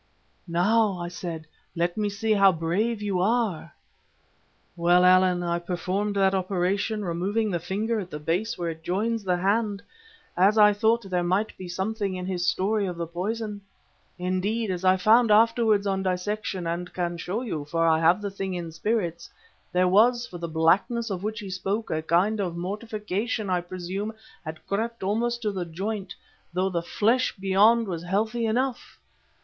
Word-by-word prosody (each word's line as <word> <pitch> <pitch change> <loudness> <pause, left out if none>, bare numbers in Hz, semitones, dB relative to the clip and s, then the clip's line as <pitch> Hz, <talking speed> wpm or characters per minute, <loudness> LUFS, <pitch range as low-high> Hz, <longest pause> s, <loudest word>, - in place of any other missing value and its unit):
"'Now,' 195 +4 +2
I 175 0 -4
said, 170 -3 -6 0.3
'let 175 +1 0
me 210 -1 0
see 215 +2 0
how 195 -2 +6
brave 200 +7 -1
you 195 -3 0
are.' 205 -6 0 1.0
"Well, 175 +1 +4
Allan, 185 -1 +4
I 170 0 0
performed 185 +4 -2
that 195 -1 +3
operation, 195 +3 -1
removing 200 +6 -1
the 175 - -1
finger 215 +6 -2
at 185 -3 -6
the 150 - -5
base 170 +9 -1
where 170 -1 -2
it 160 0 -10
joins 210 +6 -1
the 180 -2 +1
hand, 200 +2 0 0.5
as 195 +5 +4
I 210 -1 +7
thought 225 +3 +2
there 180 -2 0
might 185 +5 0
be 185 - -8
something 195 +2 -2
in 180 0 -5
his 180 -1 -2
story 200 +3 +1
of 175 -2 -5
the 170 - -2
poison. 205 +5 -4 0.6
Indeed, 190 +4 -1
as 180 0 -4
I 185 0 +5
found 225 +5 +5
afterwards 220 -1 +4
on 195 -1 0
dissection, 185 0 -2
and 170 +2 -3
can 175 -1 -2
show 190 +8 -3
you, 160 - -4
for 165 +3 0
I 160 -1 +4
have 170 +5 +3
the 200 - -3
thing 190 -1 -4
in 170 -2 -5
spirits, 170 -1 -2 0.4
there 180 0 +3
was, 235 +6 +4
for 175 - -9
the 170 - -4
blackness 190 +8 +1
of 185 -2 -3
which 215 +2 -3
he 200 - -7
spoke—a 190 -2 -2
kind 180 +7 +2
of 175 -4 -2
mortification, 210 +2 -3
I 180 -1 +1
presume—had 185 -2 -7
crept 225 +2 -3
almost 235 +4 -1
to 210 - 0
the 190 -3 -3
joint, 190 +2 -4 0.4
though 185 +2 +1
the 175 -2 -1
flesh 230 +8 +1
beyond 205 +4 +4
was 170 -4 -4
healthy 220 +6 -1
enough. 250 +3 -2
190 Hz, 170 wpm, -26 LUFS, 175-215 Hz, 1.0 s, I